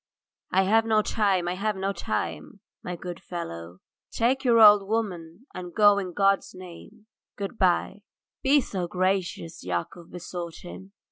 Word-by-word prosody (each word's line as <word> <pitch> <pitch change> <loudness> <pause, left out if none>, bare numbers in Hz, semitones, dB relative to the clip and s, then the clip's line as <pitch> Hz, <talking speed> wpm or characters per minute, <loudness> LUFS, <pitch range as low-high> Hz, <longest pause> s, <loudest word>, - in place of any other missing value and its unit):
"I 190 - +3
have 220 +4 +3
no 215 -1 +3
time, 195 -6 +1
I 175 - -1
have 210 +3 -2
no 195 +1 -2
time, - - -4 0.2
my 180 - -4
good 175 0 -8
fellow. 90 - -7 0.3
Take 260 +4 0
your 235 -3 +4
old 210 -2 +7
woman 195 -2 -3
and 180 -1 -8
go 205 -2 +5
in 185 -2 -5
God's 195 0 +1
name. 185 +4 -13 0.3
Goodbye." 200 -1 0 0.4
"Be 280 +2 +4
so 185 -7 -4
gracious," 185 -2 -2
Yakov 90 - -4
besought 175 -1 -7
him. 190 +2 -11
190 Hz, 145 wpm, -26 LUFS, 175-210 Hz, 0.4 s, old